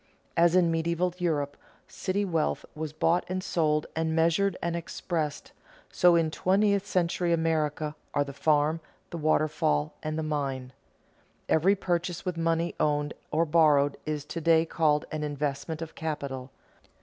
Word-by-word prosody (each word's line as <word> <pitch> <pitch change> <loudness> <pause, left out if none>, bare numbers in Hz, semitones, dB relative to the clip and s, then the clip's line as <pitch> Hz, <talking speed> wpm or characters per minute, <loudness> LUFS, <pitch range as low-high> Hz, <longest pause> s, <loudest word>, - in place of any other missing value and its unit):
As 170 +1 +4
in 175 -2 +4
medieval 170 +2 0
Europe 145 -5 -1 0.3
city 200 +2 -2
wealth 165 -5 -1
was 155 -1 -5
bought 165 +3 +2
and 185 0 -2
sold, 155 -4 +1
and 160 0 0
measured 170 +4 +2
and 170 0 -2
expressed, 165 -2 -3 0.4
so 175 -1 +5
in 165 -2 +2
twentieth 200 +3 +2
century 175 -2 0
America 155 -2 0 0.2
are 145 - +3
the 140 0 -8
farm, 150 +2 +2 0.3
the 170 - -5
waterfall, 150 - +1
and 155 0 -3
the 160 - -1
mine. 135 -4 -3 0.7
Every 185 +6 +4
purchase 180 -1 -2
with 180 -2 -2
money 165 +1 0
owned 145 -1 +1 0.2
or 160 +2 +2
borrowed 150 -3 +4
is 150 -2 -2
to 165 - -5
day 165 0 +4
called 155 -3 +1
an 155 - -3
investment 150 +2 -3
of 160 - -9
capital. 140 -5 -4
160 Hz, 150 wpm, -28 LUFS, 150-170 Hz, 0.7 s, so